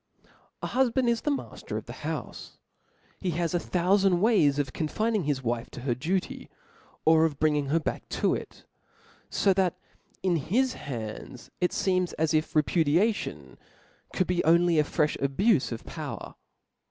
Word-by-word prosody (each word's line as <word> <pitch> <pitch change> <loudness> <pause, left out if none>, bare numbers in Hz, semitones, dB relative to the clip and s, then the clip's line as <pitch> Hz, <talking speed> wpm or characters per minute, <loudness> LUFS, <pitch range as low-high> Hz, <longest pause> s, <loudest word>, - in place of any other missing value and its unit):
A - - -1
hufband 260 -1 +2
is 235 -1 +1
the - - -1
mafter 285 - -4
of - - -6
the - - -8
houfe; - - -6 0.6
he 185 - -2
has 170 -1 0
a 175 - +2
thoufand 185 +2 +2
ways 175 -9 +3
of 140 -3 -1
confining 215 +4 -1
his 140 -3 -1
wife 120 0 -2
to - - -9
her 125 -1 0
duty, 170 +9 -3 0.6
or 160 0 +6
of 155 -3 0
bringing 150 -2 +1
her 160 +4 +2
back 155 - -4
to - - +1
it - - -7 0.3
} - - -30
fo 195 - +3
that 185 -2 +1 0.5
in 180 -3 +2
his 235 - +1
hands 120 0 -7
it 180 - +3
feems 185 -2 0
as 160 0 0
if 155 0 0
repudiation 165 +7 +1 0.5
could 185 - +1
be 175 0 0
only 170 0 +4
a - - +5
frefh 150 0 0
abufe 145 - +2
of 115 - -6
power. - - -6
170 Hz, 165 wpm, -27 LUFS, 145-195 Hz, 0.6 s, or